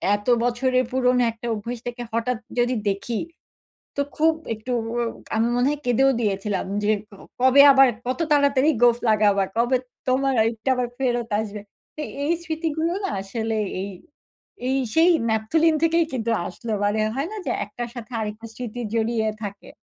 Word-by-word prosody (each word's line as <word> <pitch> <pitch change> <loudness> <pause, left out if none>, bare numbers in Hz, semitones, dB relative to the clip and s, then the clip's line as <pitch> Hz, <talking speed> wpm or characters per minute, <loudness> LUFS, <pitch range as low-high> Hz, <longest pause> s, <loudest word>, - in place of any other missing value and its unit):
এত 205 +2 -8 0.2
বছরের 255 +1 +1
পুরনো 250 -1 +3
একটা 230 +1 -8
অভ্যাস 235 +3 -5
থেকে 245 0 -5
হঠাৎ 230 +1 0 0.2
যদি 245 +1 +2
দেখি 210 +3 -2 0.8
তো 280 - +2
খুব 320 +1 +4 0.2
একটু 220 +4 -6 0.6
আমি 225 +2 +2
মনে 245 +2 +3
হয় 295 0 -3
কেঁদেও 265 +3 +4
দিয়েছিলাম 200 -2 -1 0.2
যে, 210 - +2 0.5
কবে 260 +2 +7
আবার 270 -1 +7 0.2
কত 255 +6 -2
তাড়াতাড়ি 285 0 +4
গোঁফ 240 -1 +6
লাগাবা, 205 -2 +3
কবে 240 +2 +3 0.3
তোমারটা 255 -3 +1
আবার 250 -1 -1
ফেরত 240 -3 0
আসবে। 210 -1 -5 0.4
তো - - -6 0.2
এই 315 - +2
স্মৃতিগুলো 320 0 -1
না 385 - -1
আসলে 220 +2 -3 0.3
এই, 200 - -5 0.8
এই 265 - +1 0.2
সেই 330 +2 +6 0.2
ন্যাপথলিন 310 +10 +2
থেকেই 335 +1 +3
কিন্তু 230 -2 -2 0.2
আসল 230 +6 -9 0.2
মানে 205 +1 +1 0.2
হয় 280 +4 -1
না - - -5
যে, - - 0 0.2
একটার 240 +3 -6
সাথে 240 +1 -8
আরেকটা 215 +1 -5
স্মৃতি 245 -1 -6
জড়িয়ে 225 0 +1 0.2
থাকে। 200 -1 -7
245 Hz, 155 wpm, -23 LUFS, 220-270 Hz, 0.8 s, কবে